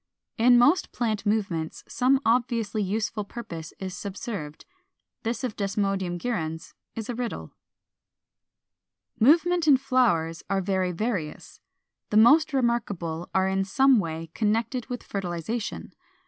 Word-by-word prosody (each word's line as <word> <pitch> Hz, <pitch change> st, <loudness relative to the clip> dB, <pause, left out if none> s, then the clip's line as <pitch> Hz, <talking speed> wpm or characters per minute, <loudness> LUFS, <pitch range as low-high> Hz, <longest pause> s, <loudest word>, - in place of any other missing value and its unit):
In 245 Hz, +2 st, +6 dB
most 290 Hz, +10 st, +4 dB
plant 220 Hz, -4 st, -2 dB
movements 195 Hz, -7 st, -1 dB
some 260 Hz, +2 st, +2 dB
obviously 230 Hz, -3 st, +1 dB
useful 210 Hz, +2 st, -2 dB
purpose 195 Hz, -8 st, -8 dB
is 190 Hz, -1 st, -6 dB
subserved: 190 Hz, -6 st, -6 dB, 0.6 s
this 235 Hz, +3 st, -3 dB
of 245 Hz, -5 st, -3 dB
Desmodium 195 Hz, -3 st, -1 dB
gyrans 165 Hz, -7 st, -4 dB, 0.2 s
is 225 Hz, -1 st, -5 dB
a 245 Hz, -, -3 dB
riddle. 230 Hz, -, -5 dB, 1.7 s
475. -, -, -33 dB
=Movements 340 Hz, +2 st, +4 dB
in 280 Hz, -3 st, +7 dB
Flowers= 230 Hz, -12 st, +1 dB
are 195 Hz, -1 st, +1 dB
very 190 Hz, -1 st, 0 dB
various. 180 Hz, -5 st, -4 dB, 0.5 s
The 210 Hz, -, +2 dB
most 290 Hz, +9 st, +6 dB
remarkable 205 Hz, -, -1 dB
are 190 Hz, 0 st, +3 dB
in 190 Hz, 0 st, +1 dB
some 265 Hz, +5 st, +4 dB
way 165 Hz, -2 st, -4 dB
connected 225 Hz, +3 st, -1 dB
with 245 Hz, -2 st, -5 dB
fertilization 195 Hz, +3 st, -4 dB
(Sect. -, -, -31 dB
210 Hz, 130 wpm, -26 LUFS, 185-245 Hz, 1.7 s, in